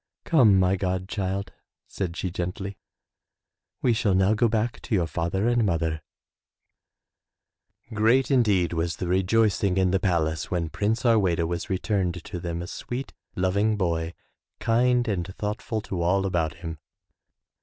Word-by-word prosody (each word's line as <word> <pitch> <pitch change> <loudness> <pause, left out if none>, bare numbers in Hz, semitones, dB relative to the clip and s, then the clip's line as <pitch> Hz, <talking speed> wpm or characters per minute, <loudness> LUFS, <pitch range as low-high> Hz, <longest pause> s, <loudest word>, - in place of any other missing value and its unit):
"Come, 120 - +5
my 95 +1 +3
god 95 0 -2
child,'* 100 0 -3 0.4
said 90 -3 -4
she 90 - -2
gently, 95 +2 -4 1.0
we 125 - +4
shall 110 -4 +1
now 95 +3 +4
go 115 +2 +3
back 115 +1 -1
to 115 - -1
your 90 -4 +2
father 85 +6 -1
and 120 -1 +3
mother 80 -4 0 1.0
.'* 115 - -24
Great 115 +6 +3
indeed 105 -10 +3
was 85 0 -1
the - - -4
rejoicing 95 +1 +2
in 95 -1 +3
the 95 - +2
palace 80 -5 0
when 85 -3 -1
Prince 110 +8 -1
Harweda 95 -8 +3
was 85 +4 -3
returned 95 -3 -1
to 90 - -6
them 85 0 -4
a - - -7
sweet, 125 +8 -6 0.2
loving 100 +4 +1
boy, 85 -3 -1 0.4
kind 120 +1 +2
and 95 -5 -1
thoughtful 105 +1 -3
to 95 -4 -4
all 95 +3 +2
about 85 -6 0
him. 85 -3 -7
95 Hz, 150 wpm, -26 LUFS, 85-110 Hz, 1.0 s, Come